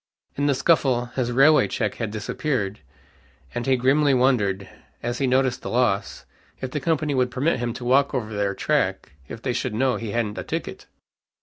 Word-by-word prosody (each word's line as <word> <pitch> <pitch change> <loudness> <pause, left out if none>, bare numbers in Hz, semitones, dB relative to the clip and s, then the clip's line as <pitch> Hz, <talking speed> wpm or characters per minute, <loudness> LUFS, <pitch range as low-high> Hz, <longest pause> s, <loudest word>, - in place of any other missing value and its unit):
In 145 +1 0
the 140 - +2
scuffle, 130 -6 +2
his 125 -2 -1
railway 140 +5 +5
check 110 -4 -2
had 115 - -1
disappeared, 110 0 -2 0.7
and 120 +2 -3
he 135 - +4
grimly 135 +3 +3
wondered, 105 -7 +1 0.4
as 120 +1 -2
he 135 - +1
noticed 130 -1 +1
the - - -5
loss, 120 -5 0 0.3
if 130 - -5
the 150 - -2
company 155 -1 0
would 125 -2 +1
permit 135 +4 0
him 120 0 -1
to 125 - -7
walk 135 +3 +3
over 110 -4 -3
their 100 -1 -1
track - - 0 0.2
if 115 - -9
they 125 - -1
should 120 -2 -2
know 130 +2 +1
he 115 - -5
hadn't 105 -1 -2
a - - -4
ticket. - - -5
125 Hz, 190 wpm, -24 LUFS, 115-135 Hz, 0.7 s, railway